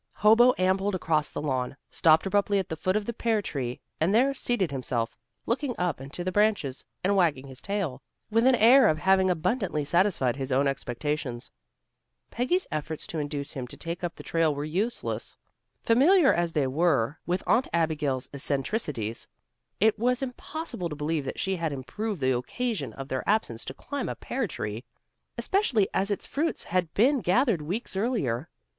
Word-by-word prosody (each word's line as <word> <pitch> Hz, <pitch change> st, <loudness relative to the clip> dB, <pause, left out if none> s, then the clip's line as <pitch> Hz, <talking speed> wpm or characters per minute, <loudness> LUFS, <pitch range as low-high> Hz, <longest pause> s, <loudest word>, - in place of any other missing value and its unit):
Hobo 230 Hz, +4 st, +6 dB
ambled 190 Hz, +2 st, +1 dB
across 155 Hz, -4 st, +1 dB
the -, -, -5 dB
lawn, 130 Hz, -1 st, -2 dB
stopped 160 Hz, 0 st, +4 dB
abruptly 200 Hz, +1 st, +2 dB
at 190 Hz, -, -2 dB
the 160 Hz, -, -2 dB
foot 185 Hz, +4 st, -1 dB
of 215 Hz, -1 st, 0 dB
the 235 Hz, -, -3 dB
pear 225 Hz, -1 st, +1 dB
tree, 130 Hz, -10 st, -4 dB, 0.2 s
and 175 Hz, +6 st, +2 dB
there 265 Hz, +4 st, +4 dB
seated 240 Hz, -, -1 dB
himself, 125 Hz, -4 st, -2 dB, 0.3 s
looking 250 Hz, +1 st, -1 dB
up 175 Hz, -7 st, -1 dB
into 140 Hz, +6 st, -6 dB
the 185 Hz, -, -1 dB
branches, 205 Hz, -10 st, +1 dB, 0.2 s
and 200 Hz, +2 st, +2 dB
wagging 160 Hz, -8 st, +2 dB
his 130 Hz, -2 st, -8 dB
tail, 195 Hz, -11 st, -2 dB, 0.3 s
with 230 Hz, +3 st, +4 dB
an 260 Hz, -, +6 dB
air 245 Hz, +4 st, +7 dB
of 155 Hz, -, +2 dB
having 190 Hz, +3 st, +3 dB
abundantly 180 Hz, -, 0 dB
satisfied 170 Hz, -, +2 dB
his 135 Hz, -1 st, -4 dB
own 135 Hz, +2 st, +3 dB
expectations. 135 Hz, -1 st, -3 dB, 0.8 s
Peggy's 350 Hz, +11 st, 0 dB
efforts 155 Hz, +1 st, -4 dB
to 160 Hz, -, -4 dB
induce 145 Hz, -1 st, -3 dB
him 130 Hz, -3 st, -5 dB
to -, -, -9 dB
take 170 Hz, +2 st, -5 dB
up 175 Hz, -, -3 dB
the -, -, -10 dB
trail 165 Hz, -3 st, +1 dB
were 145 Hz, +1 st, -3 dB
useless. 200 Hz, +10 st, -3 dB, 0.5 s
Familiar 280 Hz, +7 st, +5 dB
as 170 Hz, -1 st, 0 dB
they 145 Hz, -3 st, +2 dB
all 130 Hz, -, -3 dB
were 145 Hz, -5 st, +2 dB
with 180 Hz, +2 st, 0 dB
Aunt 250 Hz, +3 st, +3 dB
Abigail's 155 Hz, -6 st, 0 dB
eccentricities, 140 Hz, -, -2 dB, 0.5 s
it 215 Hz, +1 st, +3 dB
was 250 Hz, +3 st, +1 dB
impossible 260 Hz, -, -4 dB
to 150 Hz, -, -5 dB
believe 150 Hz, 0 st, -2 dB
that -, -, -5 dB
she 190 Hz, -1 st, 0 dB
had 165 Hz, -2 st, -1 dB
improved 150 Hz, -, -4 dB
the 130 Hz, -1 st, +2 dB
occasion 150 Hz, -, -3 dB
of 135 Hz, +2 st, -7 dB
their 130 Hz, -1 st, -2 dB
absence 160 Hz, -, 0 dB
to -, -, -5 dB
climb 285 Hz, -2 st, -4 dB
a -, -, -3 dB
pear 250 Hz, -3 st, -3 dB
tree, 105 Hz, -, -5 dB, 0.5 s
especially 270 Hz, -, +2 dB
as 195 Hz, +2 st, +1 dB
its 205 Hz, -, -2 dB
fruit 320 Hz, +4 st, -1 dB
had 180 Hz, -2 st, -1 dB
been 265 Hz, +6 st, +4 dB
gathered 215 Hz, -, +2 dB
weeks 190 Hz, +8 st, -4 dB
earlier. 190 Hz, -, -1 dB
175 Hz, 180 wpm, -27 LUFS, 140-220 Hz, 0.8 s, air